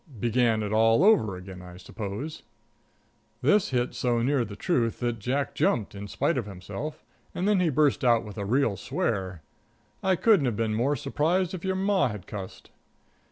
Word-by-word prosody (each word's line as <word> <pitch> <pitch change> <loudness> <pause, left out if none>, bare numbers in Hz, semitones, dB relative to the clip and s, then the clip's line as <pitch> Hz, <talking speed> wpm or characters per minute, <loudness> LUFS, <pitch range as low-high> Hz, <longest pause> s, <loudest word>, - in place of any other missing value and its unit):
"Began 115 -1 +2
it 105 0 -3
all 115 +6 +4
over 190 - +4
again, 90 0 -9
I 90 -1 -11
suppose." 110 - -6 1.0
This 195 +9 +3
hit 125 -1 0
so 120 -2 0
near 135 0 +2
the 100 -3 -7
truth 115 - 0
that 120 -2 -1
Jack 130 +6 -1
jumped, 110 -4 0
in 100 0 -7
spite 145 +7 0
of 110 - -5
himself, 100 +10 -7 0.3
and 185 - -1
then 210 -2 +3
he 180 -2 +2
burst 145 -1 +2
out 120 -2 +3
with 105 +1 -8
a - - -2
really 115 -1 +1
swear. 95 -4 -2 0.6
I 190 -1 +2
couldn't 190 - +4
have 115 -4 -2
been 110 -1 0
more 125 +7 +1
surprised 165 +7 0
if 180 - -6
your 190 0 0
Ma 195 -2 +2
had 105 -5 -7
cussed. 95 -3 -8
120 Hz, 180 wpm, -27 LUFS, 105-150 Hz, 1.0 s, all